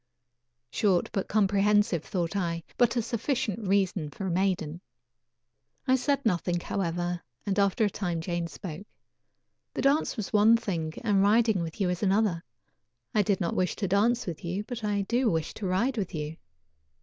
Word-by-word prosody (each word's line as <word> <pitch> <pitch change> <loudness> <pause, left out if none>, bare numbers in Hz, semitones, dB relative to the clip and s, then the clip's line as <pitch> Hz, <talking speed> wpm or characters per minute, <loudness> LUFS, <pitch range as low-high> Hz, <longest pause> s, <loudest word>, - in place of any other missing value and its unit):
"Short 190 - +1
but 195 - -2
comprehensive," 205 -4 +2
thought 175 -2 -2
I, 170 -3 -1
"but 245 0 +3
a 235 - +1
sufficient 235 -3 -2
reason 190 -5 +1
for 195 - -6
a 185 - -1
maiden." 175 -3 0 1.1
I 260 - +5
said 280 +1 0
nothing, 175 -3 +1
however, 175 -1 -2 0.2
and 200 0 0
after 200 +2 +3
a - - +2
time 175 -5 -2
Jane 170 0 -2
spoke: 180 +3 -8 0.9
"The - - -2
dance 275 0 +2
was 215 -1 -4
one 215 +2 +6
thing 165 -8 -3
and 205 -4 +3
riding 215 -1 +4
with 165 +2 -5
you 195 - +2
is 180 - -3
another. 195 -4 +2 0.7
I 215 - +4
did 200 -2 +1
not 170 - -1
wish 185 -1 0
to 200 - -2
dance 225 +6 +2
with 170 -4 -6
you, 180 +4 -2
but 235 0 -7
I 205 -1 0
do 240 +4 +1
wish 160 -3 -1
to 200 - -4
ride 230 +8 +1
with 190 -4 -3
you. 150 +1 -4
195 Hz, 175 wpm, -28 LUFS, 175-215 Hz, 1.1 s, one